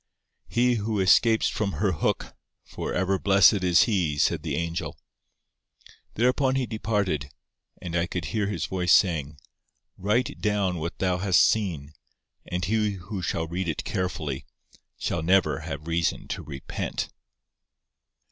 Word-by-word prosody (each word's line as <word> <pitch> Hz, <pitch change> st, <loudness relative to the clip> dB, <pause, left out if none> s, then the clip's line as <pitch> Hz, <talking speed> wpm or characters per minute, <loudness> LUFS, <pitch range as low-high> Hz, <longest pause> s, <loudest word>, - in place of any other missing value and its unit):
"He 120 Hz, 0 st, +2 dB
who 105 Hz, 0 st, -2 dB
escapes 110 Hz, +4 st, +4 dB
from 100 Hz, -2 st, -2 dB
her 100 Hz, -2 st, +1 dB
hook, 80 Hz, -, -1 dB, 0.3 s
for -, -, -6 dB
ever 95 Hz, +1 st, 0 dB
blessed 100 Hz, 0 st, +5 dB
is 90 Hz, -1 st, +5 dB
he," 90 Hz, -10 st, 0 dB
said 80 Hz, +2 st, +2 dB
the 75 Hz, -3 st, -3 dB
angel. 85 Hz, +1 st, -3 dB, 1.2 s
Thereupon 130 Hz, +3 st, +2 dB
he 135 Hz, -1 st, +1 dB
departed, 105 Hz, -, -1 dB, 0.5 s
and 85 Hz, -1 st, -5 dB
I 85 Hz, +1 st, +1 dB
could 90 Hz, -, -4 dB
hear 105 Hz, -3 st, 0 dB
his 105 Hz, -, -2 dB
voice 90 Hz, -2 st, -1 dB
saying, 75 Hz, -6 st, +3 dB, 0.6 s
"Write 105 Hz, +6 st, 0 dB
down 100 Hz, -4 st, 0 dB
what 85 Hz, +2 st, -4 dB
thou 90 Hz, -1 st, 0 dB
hast 95 Hz, -2 st, +4 dB
seen, 80 Hz, -9 st, -1 dB, 0.5 s
and 90 Hz, 0 st, -2 dB
he 105 Hz, 0 st, +1 dB
who 95 Hz, +1 st, -6 dB
shall 85 Hz, -1 st, -1 dB
read 85 Hz, +3 st, -3 dB
it 80 Hz, -, -3 dB
carefully, 80 Hz, -7 st, -3 dB, 0.5 s
shall -, -, -2 dB
never 85 Hz, -2 st, +3 dB
have 75 Hz, -2 st, -6 dB
reason 85 Hz, 0 st, -1 dB
to -, -, -3 dB
repent." 70 Hz, -2 st, -5 dB
95 Hz, 140 wpm, -26 LUFS, 85-105 Hz, 1.2 s, blessed